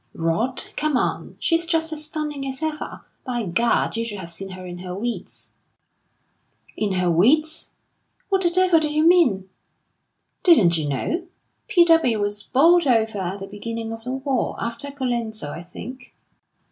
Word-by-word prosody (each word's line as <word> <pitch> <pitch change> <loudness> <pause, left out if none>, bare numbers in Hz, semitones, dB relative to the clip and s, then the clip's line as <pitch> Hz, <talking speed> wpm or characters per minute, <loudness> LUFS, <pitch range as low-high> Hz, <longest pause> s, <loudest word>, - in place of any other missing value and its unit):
"Rot 165 +11 -1
come 305 -3 +1
on! - - -2
She's 330 -1 +2
just 325 -1 +1
as 305 0 -2
stunning 300 -2 -4
as 265 +3 -5
ever. 310 -1 -4 0.2
By 245 -2 -2
Gad, 225 +8 +1
you 230 - -1
should 220 -3 -5
have 170 -3 -7
seen 195 +3 -8
her 185 0 -9
in 175 0 -7
her 180 0 -6
weeds!" 235 +4 -5 1.2
"In 205 -3 -1
her 180 -1 +1
weeds! 300 - +2 0.6
What 385 -1 +2
the 345 - +3
devil 365 -1 +4
do 305 -1 -1
you 305 +1 +2
mean?" 250 - +4 0.9
"Didn't 215 - +6
you 155 -3 -1
know? 335 - -2 0.4
P. 350 -4 +5
W. 325 -10 +4
was 205 0 -1
bowled 330 - +4
over 225 -4 +2
at 190 +2 -4
the 195 - -6
beginning 225 +2 -5
of 225 0 -9
the 250 +2 -4
war 265 -1 -1
after 235 +5 -4
Colenso, 235 - -3
I 165 - -7
think." 245 +9 -10
240 Hz, 165 wpm, -23 LUFS, 195-310 Hz, 1.2 s, Didn't